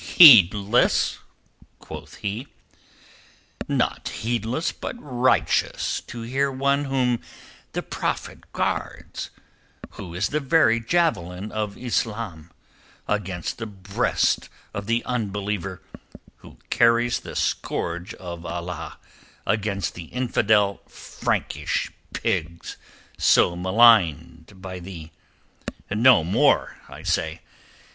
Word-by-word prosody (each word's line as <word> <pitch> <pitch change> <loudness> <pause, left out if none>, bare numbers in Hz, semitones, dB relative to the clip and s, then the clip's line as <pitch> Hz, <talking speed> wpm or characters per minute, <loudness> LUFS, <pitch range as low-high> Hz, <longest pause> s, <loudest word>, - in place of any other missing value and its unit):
"Heedless?" 105 - +7 0.6
quoth - - -10
he. 105 +7 -4 1.2
"Not - - -1
heedless 120 - -2
but - - -6
righteous 130 - 0
to 120 - -7
hear 135 +4 0
one 140 +2 +1
whom 125 -3 +1 0.5
the - - -2
Prophet - - -4
guards, - - -3 0.6
who 90 -4 -9
is 95 +4 0
the 150 - 0
very 135 -5 +3
javelin 110 - 0
of 105 -2 -3
Islam 110 -9 -3 0.6
against 95 -3 -3
the 115 - -4
breast 100 -1 0 0.2
of 100 0 -5
the 115 +1 0
unbeliever, 100 -5 -3 0.5
who - - -15
carries 120 0 +3
the - - -10
scourge 85 +5 -2
of 85 -2 -8
Allah 85 0 -6 0.5
against 105 -2 -1
the 85 - -8
infidel 105 -3 +1
Frankish - - -2 0.2
pigs, 85 +2 -3 0.4
so 85 - +4
maligned 95 - +3
by 90 -1 -6
thee! 85 -3 -9 0.8
No 115 -1 +5
more, 85 +4 +2
I - - -11
say! - - -1
105 Hz, 100 wpm, -24 LUFS, 90-120 Hz, 1.2 s, Heedless